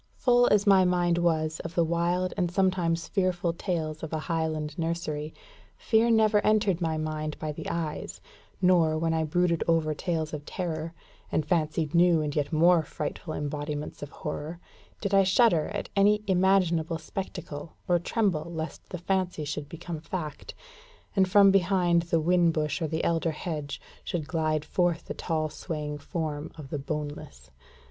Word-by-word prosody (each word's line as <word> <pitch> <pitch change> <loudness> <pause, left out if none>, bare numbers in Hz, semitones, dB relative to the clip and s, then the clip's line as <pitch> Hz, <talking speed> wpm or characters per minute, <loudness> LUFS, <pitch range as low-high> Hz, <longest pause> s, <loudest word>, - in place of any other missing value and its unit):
Full 245 -1 +4
as 210 0 +3
my 195 -2 +6
mind 175 -1 +2
was 160 -2 +1
of 165 0 -7
the 170 - +4
wild 170 +2 0
and 180 -3 0
sometimes 175 -3 +1
fearful 180 -3 0
tales 165 -4 -3
of 160 - -6
a 160 - -1
Highland 155 -1 -2
nursery, 160 -2 -2 0.5
fear 225 +1 +2
never 220 -2 +4
entered 205 -4 +2
my 160 -2 0
mind 155 -1 -3
by 155 - -3
the 150 - -6
eyes, 160 -3 -4 0.4
nor, 170 -4 +4
when 165 0 0
I 160 0 +1
brooded 170 +2 +1
over 165 -2 +2
tales 160 -1 -2
of 150 -1 -5
terror, 165 -1 -4 0.4
and 155 - 0
fancied 155 -1 0
new 170 -1 +5
and 150 -2 -2
yet 145 -2 0
more 170 +2 +5
frightful 155 +1 -5
embodiments 145 0 -4
of 145 - -6
horror, 155 +2 -6 0.4
did 200 -2 -2
I 195 - +7
shudder 190 -4 +4
at - - -5
any 210 +1 +4
imaginable 180 -4 +2
spectacle, 165 -3 -6
or 175 -2 +3
tremble 180 -4 0
lest 160 -1 -6
the 180 - -5
fancy 180 -3 -1
should 145 0 -4
become 165 -1 -6
fact, 155 -2 -6 0.6
and 190 -2 +3
from 200 +1 +7
behind 180 -2 +3
the 165 - +3
whin 170 +1 +3
bush 155 +2 -1
or 160 - 0
the 160 +1 -2
elder 165 0 +1
hedge 150 -3 -4 0.2
should 160 -4 -3
glide 155 -2 0
forth 175 0 0
the - - -5
tall 155 -2 -2
swaying 150 -1 -5
form 155 -3 -4
of 145 -4 -10
the 150 - -2
Boneless. 145 - -6
165 Hz, 165 wpm, -28 LUFS, 155-180 Hz, 0.6 s, I